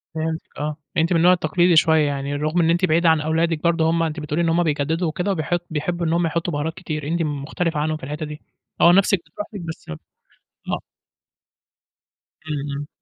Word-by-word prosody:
فهمتِك، 160 0 -2 0.2
آه، 150 0 -3 0.2
أنتِ 165 +2 +2
من - - +4
النوع 180 +2 +6
التقليدي 175 +1 +2
شوية 160 0 +5
يعني، 140 0 -2
رُغم 155 +4 0
إن 165 - +3
أنتِ 175 +2 +3
بعيدة 165 0 +3
عن 160 -2 +3
أولادِك 160 +1 0
برضو 165 -1 +2
هُم 165 0 +2
أنتِ 160 0 -2
بتقولي 150 +2 -2
إن 165 - +2
هُم 170 +2 +3
بيجددوا 160 +2 0
وكده 180 +5 -1
وبيحط 175 0 -1
بيحبوا 170 +3 -2
إن 160 - +1
هُم 170 0 +2
يحطوا 170 +1 -1
بهارات 150 +3 -2
كتير، 155 -5 -5
أنتِ 170 +1 0
م 145 -3 -2
مختلفة 165 0 -2
عنهم 155 +1 0
في - - -20
الحتة 150 +3 -4
دي، 150 0 -8 0.4
آه، 170 - +8
نَفسِك 195 0 +4
بتروح 170 +6 -7
لك 200 - -6
بس 165 -1 -8 0.8
آه. - - -1 1.7
امم 150 -2 -3
امم. 145 +1 -5
160 Hz, 205 wpm, -22 LUFS, 150-170 Hz, 1.7 s, آه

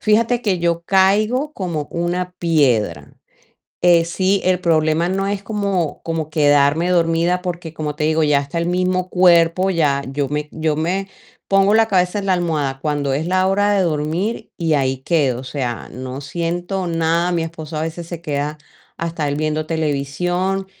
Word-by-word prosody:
Fíjate 230 +3 +2
que 190 -7 0
yo 170 0 0
caigo 215 - +2
como 170 - -4
una 175 +1 -2
piedra. 120 - +1 0.7
Eh, 175 -1 +5
sí, 185 +3 0
el 185 -1 +2
problema 160 -1 +2
no 195 +1 -1
es 200 0 -2
como 200 -7 -2
como 165 -2 -3
quedarme 145 +2 +3
dormida 170 +1 +2
porque 175 -3 -5
como 150 -2 -4
te 150 - -1
digo, 160 +1 +2
ya 150 -2 +3
hasta 140 +4 -4
el 170 - -1
mismo 185 +1 0
cuerpo 180 0 +4
ya 150 -6 +1
yo 140 0 -1
me 150 +1 -3
yo 155 -1 -1
me 185 +5 -1 0.4
pongo 195 +1 +4
la 225 0 +4
cabeza 180 0 +1
en 200 - -4
la 190 - +3
almohada 155 -6 -1
cuando 145 -3 -1
es 155 +4 -2
la 185 +1 +2
hora 205 +2 +2
de 200 - +2
dormir 165 +6 -2
y 165 -2 +1
ahí 135 -2 +1
quedo, 135 -4 0
o - - -10
sea, 125 -3 -4
no 130 +2 -6
siento 175 +5 -3
nada, 165 +1 +1
mi 170 -1 0
esposo 160 -1 -6
a - - -2
veces 165 +1 -5
se 170 -1 -7
queda 150 -1 -3 0.4
hasta 165 -2 -2
él 145 0 -1
viendo 155 0 -1
televisión 165 +5 -1
170 Hz, 175 wpm, -19 LUFS, 150-185 Hz, 0.7 s, Eh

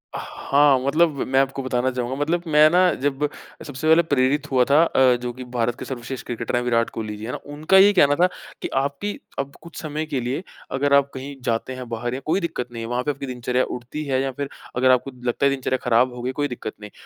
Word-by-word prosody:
हाँ, 140 -1 +2
मतलब 150 +4 +2
मैं 130 +1 +3
आपको 135 0 0
बताना 130 0 0
चाहूँगा, 125 0 -3
मतलब 160 +5 0
मैं 155 0 +6
ना 180 +2 +4
जब 145 +1 +1 0.4
सबसे 145 +2 -4
पहले 160 +1 +7
प्रेरित 145 0 +1
हुआ 130 -1 +4
था 145 +3 +6
अ, 130 -6 +4
जो 125 0 -3
कि 130 +1 -8
भारत 120 -1 -1
के - - -6
सर्वश्रेष्ठ 130 0 -6
क्रिकेटर 115 -1 -3
हैं 120 - +2
विराट 115 -1 +1
कोहली 110 -1 -5
जी, 105 - -7
हैं 120 - -4
ना? - - -4 0.2
उनका 155 +6 +3
ये 200 +2 +8
कहना 145 -6 +5
था 180 +4 +4 0.3
कि, - - -2
"आपकी 140 +9 -2 0.2
अब 140 +1 -4
कुछ 170 +1 -10
समय 155 0 -3
के 145 -4 -2
लिए 130 +8 -3 0.3
अगर 140 +2 +1
आप 140 0 +5
कहीं 135 +2 -7
जाते 115 +3 -1
हैं 130 -1 -7
बाहर, 120 +1 -3
या 130 - -3
कोई 165 +5 +1
दिक्कत 165 -9 -3
नहीं 115 -1 -6
है - - -5
वहाँ 125 +1 -1
पे 150 - 0
आपकी 140 0 -6
दिनचर्या 125 0 -1
उठती 125 +5 -5
है, 135 -2 0
या 135 0 -1
फिर 140 +2 -5 0.3
अगर 130 +1 +4
आपको 130 +2 +1 0.2
लगता 120 +3 +1
है - - +6
दिनचर्या 130 -1 -1
खराब 125 +1 +3
हो 125 - -7
गई, 125 +1 -2
कोई 145 +2 -1
दिक्कत 125 -4 -6
नहीं। 105 0 -9
135 Hz, 245 wpm, -23 LUFS, 125-145 Hz, 0.4 s, ये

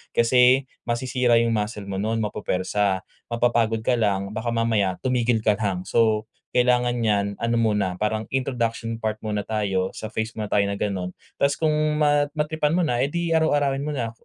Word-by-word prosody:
Kasi 125 +3 +5 0.2
masisira 120 0 +1
'yong 115 0 +2
muscle 105 0 -2
mo 95 -1 -3
no'n, 110 +2 -1
mapupwersa, 100 -1 -1 0.3
mapapagod 115 -2 +1
ka 125 - +3
lang 100 -2 0
baka 110 +2 -3
mamaya 110 -5 +1
tumigil 120 -3 +1
ka 105 - +4
lang. 95 -4 -1
So, 110 -2 +2 0.3
kailangan 125 -1 +2
niyan 100 -3 0
ano 115 0 0
muna 105 -5 +1
parang 105 +2 -2
introduction 115 -3 -2
part 110 -1 -1
muna 105 -1 -2
tayo 100 -4 0
sa 110 - -6
phase 110 +1 -3
muna 105 -2 -5
tayo 100 -1 +3
na 100 - -2
ganon. 95 -3 -3 0.2
Tas 140 +1 +2
kung 155 -1 +1 0.2
mat 145 -1 +3
matripan 150 0 0
mo 180 - +2
na, 125 -7 0
eh, - - +1
di 170 0 -1
araw-arawin 145 -4 +2
mo 150 -1 -3
na, 115 -4 -2
115 Hz, 175 wpm, -24 LUFS, 105-125 Hz, 0.3 s, Kasi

